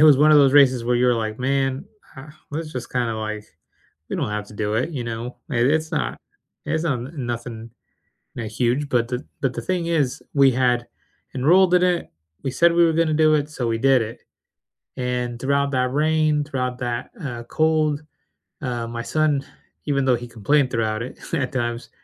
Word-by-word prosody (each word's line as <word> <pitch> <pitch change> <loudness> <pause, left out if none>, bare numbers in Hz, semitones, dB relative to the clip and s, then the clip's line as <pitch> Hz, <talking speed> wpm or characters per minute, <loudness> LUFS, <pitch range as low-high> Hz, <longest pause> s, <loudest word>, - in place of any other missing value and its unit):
it - - +5
was 150 -3 +8
one 150 +1 +6
of 150 - +8
those 135 -2 +5
races 130 -4 +5
where 120 0 +2
you 125 +1 +3
were 125 - +4
like, 110 -1 -3
"Man, 135 0 0 0.3
uh, 135 +3 -10 0.2
let's 155 +1 -5
just 125 -2 -6
kinda 120 -3 0
like 110 -1 -4 0.7
We - - -2
don't - - -1
have 105 0 -3
to - - -13
do 105 0 -2
it." 125 +8 0
You 135 -6 -4
know? 115 +2 -5
It, 120 0 +2
it's 160 +3 +1
not, 155 - -2 0.5
it's 160 +1 -1
not 135 -7 0 0.2
nothing, 120 -3 -5 0.7
n 115 -2 -3
huge. 125 +6 0
But 120 -3 +1
the 125 +3 -4 0.2
but 135 -3 +1
the - - -4
thing 180 -2 -1
is 150 -7 0
we 140 -1 +6
had 125 -1 +1 0.5
enrolled 175 +7 +4
in 180 0 +5
it, 180 - 0 0.3
we 135 - 0
said 170 +5 +4
we 170 0 +5
were 165 - +3
gonna 165 -1 +2
do 155 0 +4
it, 150 0 0
so 125 -6 -3
we 115 0 0
did 135 0 +4
it. 115 +1 -7 0.8
And 125 -1 -2
throughout 140 +2 +1
that 125 -1 +1
rain, 155 0 +2
throughout 125 -3 -3
that, 120 -2 -3
uh, 120 -4 -5
cold, 155 0 +1 0.6
uh, 120 -3 -3
my 115 0 -5
son 150 -1 +1 0.4
even 140 -2 +1
though 130 -2 +4
he 120 +1 -7
complained 125 +4 +1
throughout 110 -1 -1
it 125 - -9 0.2
at 130 -3 -1
times, 120 -3 -3
130 Hz, 200 wpm, -22 LUFS, 120-150 Hz, 0.8 s, was